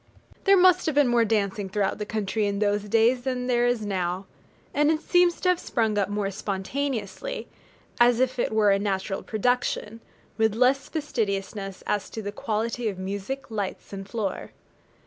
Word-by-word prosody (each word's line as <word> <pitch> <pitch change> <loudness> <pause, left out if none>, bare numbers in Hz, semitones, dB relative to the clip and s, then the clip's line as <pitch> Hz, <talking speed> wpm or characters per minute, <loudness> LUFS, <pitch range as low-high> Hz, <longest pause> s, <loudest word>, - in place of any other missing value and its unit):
There 395 -1 +6
must 365 -1 +5
have 310 - 0
been 290 -3 +4
more 240 -1 +4
dancing 205 -2 0
throughout 200 +1 -1
the 210 - -4
country 215 0 -1
in 200 0 -1
those 205 0 +1
days 230 +4 +4
than 250 -1 -2
there 245 -1 +2
is 240 -3 0
now: 185 -1 -2 0.5
and 295 +1 +3
it 315 -1 +2
seems 355 +1 +3
to 365 - +2
have 360 -1 +3
sprung 220 -3 0
up 200 -1 +1
more 205 -1 -1
spontaneously, 215 - -3 0.5
as 240 0 +5
if 255 0 +1
it - - +1
were 215 -2 +4
a 195 - +3
natural 195 -1 -2
production, 230 -1 -1 0.4
with 220 -1 +3
less 255 +3 +2
fastidiousness 200 - -3
as 205 -1 -1
to 220 - -6
the 205 - -3
quality 225 +2 -2
of 195 - -6
music, 200 +8 -5
lights, 205 -2 -4
and 195 0 -7
floor. 210 -4 -3
220 Hz, 175 wpm, -26 LUFS, 200-250 Hz, 0.5 s, There